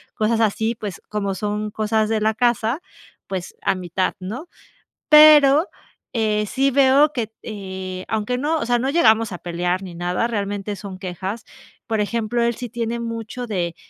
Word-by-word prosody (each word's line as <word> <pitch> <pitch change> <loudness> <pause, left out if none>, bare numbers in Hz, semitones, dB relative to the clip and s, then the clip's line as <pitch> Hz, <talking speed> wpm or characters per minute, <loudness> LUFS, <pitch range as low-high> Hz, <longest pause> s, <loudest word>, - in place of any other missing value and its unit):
cosas 225 0 +1
así, 220 +2 +1
pues 210 -4 -7
como 200 -2 -2
son 210 +1 -2
cosas 215 0 0
de 220 -1 0
la 220 +1 +2
casa, 240 +4 +1 0.5
pues 190 -2 -5
a - - +1
mitad, 185 0 -1
¿no? 235 - -6 0.6
Pero, 300 +1 +8 0.5
eh, 215 -2 +1
sí 275 +3 +1
veo 275 +2 +5
que 235 -5 -2
t 225 - -41
eh, 190 -3 -6
aunque 220 +3 -1
no, 305 +4 0
o - - -2
sea, 240 0 +2
no 265 - 0
llegamos 225 - +4
a 175 - -6
pelear 175 +2 -2
ni 180 -2 -8
nada, 175 +5 -1
realmente 205 -2 -3
son 195 -2 -8
quejas. 190 +4 -5 0.4
Por 220 -2 -1
ejemplo, 230 +2 -1
él 235 -1 +1
sí 245 -1 -6
tiene 235 0 -3
mucho 230 +1 -5
de 175 -5 -2
220 Hz, 175 wpm, -21 LUFS, 195-240 Hz, 0.6 s, Pero